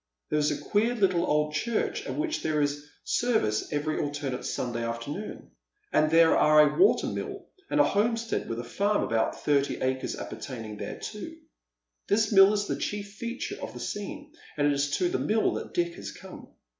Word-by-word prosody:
There 150 - +2
is 150 - +2
a 150 - -1
queer 225 +4 +1
I'ttle 185 -5 +2
old 150 0 +1
church 220 +9 -1
at - - -3
which 315 +1 -1
there 155 -1 0
is 145 0 -1 0.2
service 220 - 0
eveiy 150 +1 -1
alternate 145 -3 -3
Sunday 120 -2 -2
after 115 +3 -4
noon, 205 +7 -7 0.4
and 155 - +4
there 165 0 +6
are 155 0 +5
a 150 - +3
water 390 - +5
mill - - -4 0.2
and 295 - +1
a - - +8
homestead 230 +1 0
with 115 0 -3
a - - -4
farm 200 - 0
of - - -4
about 115 0 0
thirty 140 -1 +2
acres 130 0 -1
appertaining 110 -5 -7
thereto. - - -6 0.7
This 215 +1 +2
mill 195 -1 +8
is 205 -1 0
the - - -2
cliief 205 -1 -3
feature 235 +4 -5
of - - -6
the - - -7
scene, 295 +8 -6 0.2
and 145 - +2
it 145 - +4
is 140 +1 0
to 360 - +2
the 370 +2 -1
mill 220 +1 +1
that - - -6
Dick 170 -1 +1
has - - -6
come. - - -11
155 Hz, 195 wpm, -28 LUFS, 145-215 Hz, 0.7 s, a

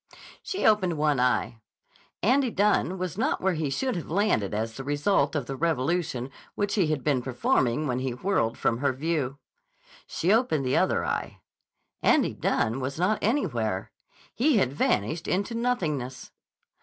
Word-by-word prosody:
She 385 - -3
opened 185 -6 +3
one 150 -3 +2
eye. 125 -2 0 0.6
Andy 255 +5 +3
Dunne 200 -3 +1
was 180 +1 -4
not 270 +6 +1
where 190 0 +1
he 155 -3 -2
should 255 - -1
have 170 - -5
landed 170 - +1
as 110 +2 -2
the 135 - -7
result 145 +2 +1
of 145 -4 -1
the 135 - -5
revolution 145 -3 -1 0.2
which 205 -1 -1
he 190 -6 +2
had 150 -4 -1
been 140 -4 +1
performing 125 +2 +1
when 125 -3 -1
he 130 0 -1
whirled 125 - 0
from 115 - 0
her 140 -1 +1
view. 140 -1 -2 0.7
She 185 +5 +1
opened 220 - +2
the 130 - +1
other - - +2
eye. - - -3 0.6
Andy - - +3
Dunne 115 +4 0
was 135 +2 -4
not 185 +5 +1
anywhere. 120 - -1 0.4
He 265 +1 +3
had 130 -9 +1
vanished 145 - 0
into 200 +5 -1
nothingness. 155 - -2
150 Hz, 160 wpm, -27 LUFS, 130-195 Hz, 0.7 s, opened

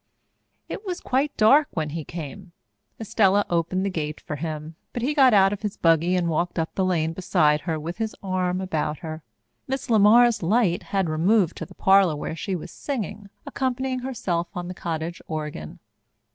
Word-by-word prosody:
It - - -6
was 365 -3 -4
quite 270 +3 -1
dark 275 +8 +6
when 155 -3 -2
he 160 0 -4
came. 170 +4 -8 0.5
Estella 205 -2 +2
opened 175 +3 0
the 200 - -1
gate 150 -3 -3
for 150 - -6
him, 155 0 -5 0.2
but 240 - -3
he 285 +4 +1
got 270 -4 +6
out 195 -2 +5
of 205 - -6
his 210 -2 -4
buggy 165 +2 +3
and 175 -2 +1
walked 170 +2 -1
up 165 -1 -1
the 190 - 0
lane 165 -3 0
beside 155 -4 +2
her 160 +1 -2
with 170 +6 -6
his 220 -1 -2
arm 185 -1 -1
about 155 -4 -2
her. 155 0 -6 0.5
Miss 265 -1 -3
LeMar's 225 +2 +6
light 185 0 +2
had 195 -3 -1
removed 175 +4 +2
to - - -6
the - - -16
parlour 190 -4 +4
where 150 - -4
she 190 +3 -3
was 170 - -7
singing, 210 -7 -5 0.2
accompanying 260 -2 -2
herself 190 -10 -2
on 175 -1 -4
the 180 - -5
cottage 170 -1 -4
organ. 150 - -5
185 Hz, 185 wpm, -24 LUFS, 165-215 Hz, 0.5 s, dark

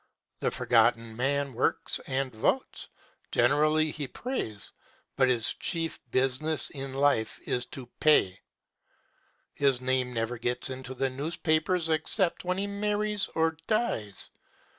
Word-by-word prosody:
The - - +1
Forgotten 115 0 +2
Man 140 +2 0
works 120 - 0
and 130 -1 -1
votes 110 - -1 0.4
generally 155 +5 +3
he 145 -2 -4
prays 125 - -4 0.4
but 130 -1 +3
his 120 -3 +3
chief 165 -1 -2
business 135 +5 +1
in 135 -1 -6
life 135 -6 +2
is 125 0 -1
to 130 - -7
pay. 150 -12 +4 1.1
His 135 -3 +3
name 130 0 0
never 115 0 -2
gets 120 +2 0
into 130 0 -6
the 135 +1 0
newspapers 155 +4 0
except 165 +4 +1
when 180 +1 -1
he 200 - -1
marries 210 0 0
or 160 0 +1
dies. 115 - -1
135 Hz, 125 wpm, -28 LUFS, 125-160 Hz, 1.1 s, pay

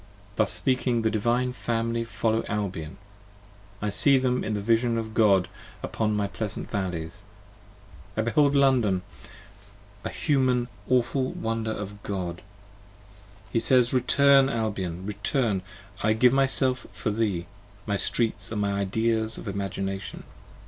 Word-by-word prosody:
Thus 110 -3 +2
speaking, 125 -3 +4
the 110 - +1
Divine 120 +4 0
Family 115 -1 -2
follow 115 0 -1
Albion: 95 -7 -4 0.9
I 105 - 0
see 135 +6 +6
them 125 -1 0
in 110 - -2
the - - -2
Vision 115 +3 +1
of 110 -1 -4
God 100 -5 +3 0.4
upon 110 -1 -1
my 105 -1 0
pleasant 105 +1 -5
valleys. 90 -1 -4 1.0
I 110 - +1
behold 140 +4 +2
London; 125 -9 +3 1.0
a - - -3
Human 130 -4 +1 0.2
awful 130 +1 +1
wonder 115 0 -3
of 105 -1 -6
God! 90 -4 -4 1.1
30 - - -25
He 115 - +3
says, 125 0 +3
Return, 135 +2 +4
Albion, 95 -7 -3
return! 105 0 -1 0.4
I 110 +2 +2
give 125 +3 +4
myself 135 -1 +3
for 105 - -3
thee: 100 -5 -1 0.4
My 100 - -1
Streets 105 -1 -1
are - - -4
my 100 -1 0
Ideas 110 +3 0
of - - -9
Imagination. 95 0 -4
110 Hz, 135 wpm, -26 LUFS, 100-125 Hz, 1.1 s, see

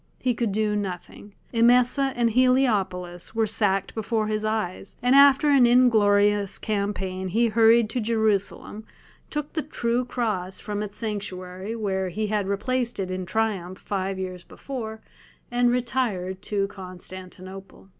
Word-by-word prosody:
He 255 -1 +1
could 230 -2 -1
do 210 +1 0
nothing; 200 +1 -6 0.2
Emesa 250 +4 +4
and 235 -1 +2
Heliopolis 210 -8 +1
were 225 0 +2
sacked 200 -2 0
before 220 0 -1
his 215 0 -2
eyes, 215 -3 -3
and 250 +1 +4
after 280 +1 +6
an 265 -4 +6
inglorious 205 -5 +4
campaign 200 -3 -2
he 230 +5 +2
hurried 225 +1 +5
to 255 - -1
Jerusalem, 220 -1 -1 0.5
took 300 -1 -4
the 315 - -1
"True 245 -4 -1
Cross" 210 -7 -3
from 210 0 -4
its 210 -1 -6
sanctuary, 195 -2 -5
where 190 -4 -1
he 215 +5 -2
had 210 -2 -1
replaced 235 +5 -1
it 185 -1 -2
in 185 -1 -4
triumph 190 -4 -1
five 195 -1 -3
years 185 -2 -5
before, 220 -5 -7 0.5
and 245 0 +3
retired 235 -7 -1
to 200 -2 -1
Constantinople. 185 0 -10
210 Hz, 140 wpm, -25 LUFS, 190-235 Hz, 0.5 s, after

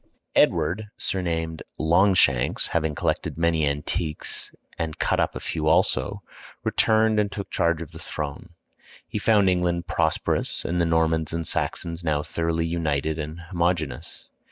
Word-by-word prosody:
Edward, 105 +5 +3
surnamed 80 -3 -2 0.2
"Longshanks," 85 -6 +3
having 80 -2 0
collected - - -1
many 80 -2 +2
antiques, 75 +3 -3 0.3
and 80 -2 -2
cut - - +1
up - - +1
a - - -3
few - - -3
also, - - +2 0.4
returned 110 -1 +3
and 105 -1 +1
took 100 0 -6
charge 85 -2 +1
of 80 - -12
the - - -10
throne. 75 -2 -5 0.6
He 105 - -3
found 105 -2 +4
England 90 -1 +1
prosperous 80 -1 0
and 85 +1 0
the 85 - +2
Normans 80 -1 +1
and 85 0 -2
Saxons 85 +2 -2
now 75 -2 +1
thoroughly 85 +1 -1
united 80 -2 -1
and 80 +3 -5
homogeneous. 85 -5 -2
85 Hz, 140 wpm, -25 LUFS, 80-90 Hz, 0.6 s, found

